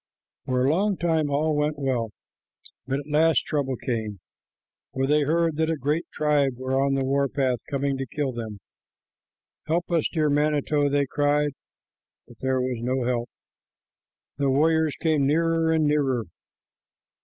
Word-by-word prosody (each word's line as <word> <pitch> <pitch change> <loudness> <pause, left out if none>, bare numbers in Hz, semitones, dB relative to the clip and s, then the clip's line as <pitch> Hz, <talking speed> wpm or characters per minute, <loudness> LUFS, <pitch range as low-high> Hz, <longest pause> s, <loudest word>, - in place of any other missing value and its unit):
For 130 -1 +1
a - - +3
long 195 +4 +1
time 160 -3 +1
all 150 +2 +1
went 150 0 0
well, 130 -5 -1 0.8
but 135 +2 -1
at 145 - -14
last 155 +2 +3
trouble 140 -3 -1
came, 110 -5 -3 0.8
for 135 0 +1
they 150 +2 +3
heard 165 +1 +1
that 160 0 +1
a 165 - 0
great 150 +5 -1
tribe 145 -3 +1
were 130 +1 0
on 140 0 +1
the 135 -1 0
war 140 +1 +1
path 130 -3 0
coming 140 -1 -1
to 135 - -3
kill 140 +2 -2
them. 110 -4 -6 1.1
"Help 170 +3 -1
us, 165 -3 +2
dear 155 -2 +1
manito," 145 0 +1
they 140 0 +2
cried 145 +1 +1 0.8
but 120 - -16
there 130 0 0
was 125 -2 -2
no 130 +1 -1
help. 120 -1 -1 1.1
The 140 -1 +2
warriors 160 +2 +2
came 155 -4 +2
nearer 165 +2 +2
and 160 -1 +2
nearer. 140 -5 +1
145 Hz, 155 wpm, -25 LUFS, 130-155 Hz, 1.1 s, a